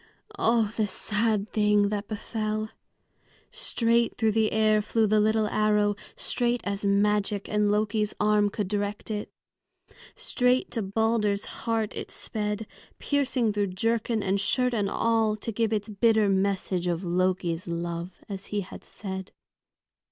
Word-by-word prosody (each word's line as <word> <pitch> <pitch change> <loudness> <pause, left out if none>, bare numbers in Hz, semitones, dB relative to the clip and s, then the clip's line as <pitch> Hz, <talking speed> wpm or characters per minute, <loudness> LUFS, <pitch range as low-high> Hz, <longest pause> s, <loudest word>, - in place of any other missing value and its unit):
Oh, 230 - +2
the 215 -2 +2
sad 210 +1 0
thing 210 -1 +3
that 205 0 -3
befell! 215 0 -3 0.8
Straight 235 0 +1
through 220 -1 +2
the 220 0 +2
air 215 -1 +3
flew 220 +1 +1
the 215 0 +3
little 215 +1 +3
arrow, 210 -1 +2 0.2
straight 245 0 0
as 200 0 -3
magic 205 0 +1
and 210 -1 +1
Loki's 210 0 0
arm 210 0 +3
could 205 -1 -3
direct 205 +2 -3
it. 210 -1 -3 0.9
Straight 255 - +1
to 230 - -1
Balder's 210 0 +1
heart 225 -2 -2
it - - -5
sped, 210 0 -3 0.3
piercing 260 -6 +1
through 205 -1 0
jerkin 225 0 0
and 195 +1 +1
shirt 250 +5 +1
and 205 -4 0
all, 225 -1 +2
to 215 +2 -5
give 225 0 0
its 210 -2 -1
bitter 220 0 +3
message 190 -2 0
of 175 +1 -1
"Loki's 180 -1 0
love," 170 +1 -4
as 195 -1 -6
he 205 -1 -1
had 190 - -10
said. 190 -1 -7
210 Hz, 145 wpm, -27 LUFS, 200-220 Hz, 0.9 s, thing